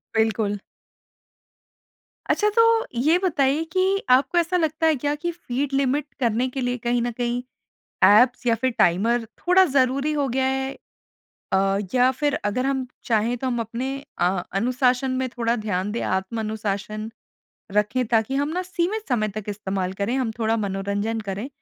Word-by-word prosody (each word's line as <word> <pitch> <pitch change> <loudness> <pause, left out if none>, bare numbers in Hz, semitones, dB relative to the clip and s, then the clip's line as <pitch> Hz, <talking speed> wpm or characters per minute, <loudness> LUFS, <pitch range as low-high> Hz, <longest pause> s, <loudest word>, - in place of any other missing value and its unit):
बिल्कुल। 220 -2 +1 1.7
अच्छा, 420 - +2
तो 455 +1 +4 0.2
ये 315 +6 +4
बताइए 300 -5 +1
कि 380 +3 +1
आपको 260 +7 +4
ऐसा 345 +1 +2
लगता 320 -1 +1
है 315 - +4
क्या 290 +2 -1
कि 345 +4 -3
फ़ीड 280 -4 -4
लिमिट 275 +1 +1
करने 240 0 +1
के 265 +1 -4
लिए 245 0 -1
कहीं 240 +1 0
न 240 +1 -1
कहीं 240 +1 -2 0.6
ऐप्स 245 +4 +5
या 230 - +4
फिर 260 +3 0
टाइमर 225 +7 +3
थोड़ा 365 +2 +5
ज़रूरी 275 -1 +1
हो 290 -2 0
गया 260 +2 0
है? 265 0 -1 0.8
अ, 195 +1 +2 0.2
या 250 0 +5
फिर 290 -2 +1
अगर 230 +6 0
हम 265 -2 -1 0.2
चाहें 230 +1 +1
तो 260 - -3
हम 245 -2 -1
अपने 230 +3 -3 0.3
अ, 180 +1 +1
अनुशासन 250 +5 +1
में 260 - -1
थोड़ा 235 -1 -1
ध्यान 205 -3 -2
दें, 235 - -2
आत्म-अनुशासन 215 +1 -3 0.6
रखें, 210 +5 +1
ताकि 225 +3 +1
हम 285 +1 0
ना 355 +4 -2
सीमित 370 +3 -2
समय 220 -5 +1
तक 210 0 -7
इस्तेमाल 195 -2 -3
करें, 200 +6 -2
हम 250 -4 0
थोड़ा 225 0 +1
मनोरंजन 200 +2 -2
करें, 205 +4 -5
245 Hz, 160 wpm, -23 LUFS, 215-280 Hz, 1.7 s, ऐप्स